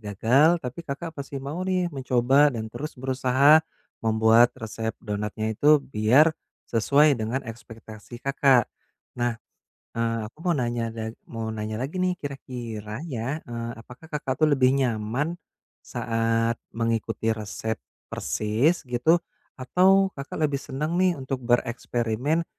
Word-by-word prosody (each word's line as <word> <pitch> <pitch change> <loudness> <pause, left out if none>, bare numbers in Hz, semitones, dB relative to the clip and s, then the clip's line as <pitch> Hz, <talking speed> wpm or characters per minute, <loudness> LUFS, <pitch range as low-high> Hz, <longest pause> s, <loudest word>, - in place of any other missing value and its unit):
gagal, 120 - +3
tapi 125 +6 -5
Kakak 160 +4 -5
masih 140 -2 -7
mau 150 +6 -4
nih 180 -2 0
mencoba 135 +1 +3
dan 110 -1 -5
terus 150 +6 -6
berusaha 130 +3 +4 0.4
membuat 110 +2 +4
resep 110 0 -4
donatnya 105 +1 -2
itu 145 +6 +4
biar 130 +8 +4 0.4
sesuai 140 +6 +4
dengan 115 +5 -2
ekspektasi 115 0 -11
Kakak. 135 -3 +3 0.5
Nah, 120 -1 +1 0.6
eee, 115 0 0
aku 115 - -45
mau 175 - +3
nanya 120 -3 -1
dag 110 0 -6
mau 115 -2 -5
nanya 110 0 -4
lagi 145 +8 -4
nih 185 0 +2
kira-kira 120 -5 -6
ya, 135 0 -4
eee, 115 -1 -5
apakah 125 +6 -14
Kakak 135 -3 -2
tuh 155 - +5
lebih 130 -2 +4
nyaman 125 +4 -1 0.5
saat 115 0 0 0.2
mengikuti 115 -1 -1
resep 110 +1 -4 0.3
persis, 125 +11 0
gitu, 125 +8 +3 0.4
atau 190 +8 +4
Kakak 140 0 -7
lebih 140 -1 -2
senang 150 +6 -3
nih 180 -3 +3
untuk 130 0 -4
bereksperimen 120 +4 0
125 Hz, 130 wpm, -25 LUFS, 115-145 Hz, 0.6 s, tuh